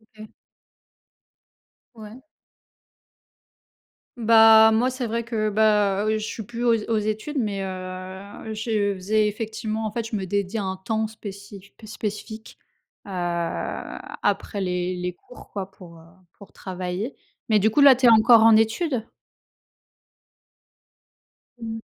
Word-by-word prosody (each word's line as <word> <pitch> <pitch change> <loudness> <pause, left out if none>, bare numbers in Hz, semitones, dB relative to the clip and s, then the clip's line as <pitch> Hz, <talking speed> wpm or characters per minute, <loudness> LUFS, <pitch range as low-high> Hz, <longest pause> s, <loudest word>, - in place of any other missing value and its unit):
OK. 215 0 -11 1.7
Ouais. 220 +2 -12 2.0
Bah 225 -1 +7
moi, 240 +3 +2
c'est 255 -1 -4
vrai 230 +1 -2
que, 220 -2 -1
bah, 210 -2 +2
heu, 215 0 +1
je 215 - -4
suis 220 - -6
plus 235 +3 -6
aux 235 - +5 0.2
aux 225 - +2
études 215 +8 -3
mais 205 -6 -1
heu, 185 +2 -7
je 215 -2 -1
faisais 210 +3 +1
effectivement, 220 +1 -4
en 215 - -3
fait, 225 +1 -4
je 225 - -4
me 195 -2 -3
dédiais 200 +2 -2
un 190 -2 -3
temps 220 +4 -2
spéci 200 -2 -9
spé 220 - -15
spécifique, 215 +1 -7 0.5
heu, - - -11 1.1
après 205 - -1
les 180 -1 -2
les 180 0 -4
cours 250 +7 -16
quoi 195 -2 -5
pour, 175 -4 -15
heu, 160 - -17 0.3
pour 200 - -14
travailler. 185 +5 -5 0.3
Mais 215 -1 +4
du 215 +2 +3
coup, 220 - 0
là, 280 -2 +8
tu 250 0 +3
es - - +9
encore 230 +1 +7
en 225 0 +7
études? 225 +2 0 2.5
Mmh. 225 -1 -5
215 Hz, 135 wpm, -23 LUFS, 195-225 Hz, 2.5 s, es